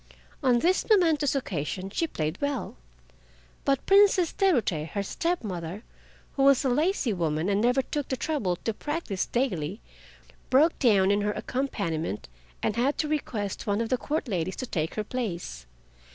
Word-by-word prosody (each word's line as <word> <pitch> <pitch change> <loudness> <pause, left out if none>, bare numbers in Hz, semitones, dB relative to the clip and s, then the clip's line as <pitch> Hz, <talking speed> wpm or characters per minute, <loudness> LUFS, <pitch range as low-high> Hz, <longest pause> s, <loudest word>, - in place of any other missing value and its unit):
On 255 -4 +4
this 355 +9 +2
momentous 320 -9 +3
occasion 190 - -3
she 330 +10 0
played 155 - -3
well. 285 -2 -2 0.9
But 275 -1 +1
Princess 390 -3 +5
Terute, 225 - +1
her 200 - -1
step 340 - -1
mother, 180 0 -5 0.5
who 275 - 0
was 275 0 +5
a - - +3
lazy 300 - +1
woman 165 0 -1
and 200 +1 +2
never 250 +3 +3
took 290 0 -3
the 260 - -2
trouble 245 - -1
to 225 +5 -3
practice 295 - -3
daily, 200 - -1 0.7
broke 300 +6 +4
down 200 -6 +4
in 205 0 +2
her 210 0 0
accompaniment 200 - -3 0.4
and 215 - 0
had 265 +5 +1
to 305 - 0
request 225 -11 -3
one 205 +1 +1
of 230 -1 -1
the 255 - +2
Court 300 -1 -2
ladies 185 -3 -2
to 255 - -4
take 160 -9 -2
her 215 - -1
place. 175 - -5
235 Hz, 165 wpm, -27 LUFS, 190-285 Hz, 0.9 s, Princess